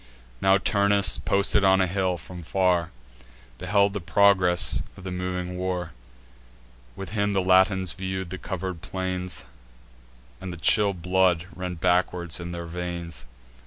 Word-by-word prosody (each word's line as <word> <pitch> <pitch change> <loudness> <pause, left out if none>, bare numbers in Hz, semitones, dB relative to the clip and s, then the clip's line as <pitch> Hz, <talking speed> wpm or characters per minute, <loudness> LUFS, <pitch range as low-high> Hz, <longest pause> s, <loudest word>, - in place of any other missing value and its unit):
Now 95 0 +5
Turnus, 100 0 +3
posted 100 +1 +2
on 95 0 +5
a 95 - +3
hill, 95 -1 -1
from 90 +2 -10
far 90 0 +1 0.7
Beheld 100 +2 +2
the 100 - -4
progress 90 0 +3 0.2
of 95 - -12
the 95 - -5
moving 90 0 -4
war: 90 -2 -3 1.0
With 95 - -7
him 105 -1 0
the 95 - +2
Latins 95 0 +3
view'd 95 -2 -5
the 95 - -5
cover'd 95 -3 -5
plains, 90 -1 -3 1.0
And 95 - -6
the 90 - -7
chill 100 +4 +2
blood 90 -1 +1
ran 90 -1 -5
backward 90 -1 0
in 85 0 -6
their 85 -1 -6
veins. 85 -6 -6
90 Hz, 140 wpm, -25 LUFS, 90-95 Hz, 1.0 s, Now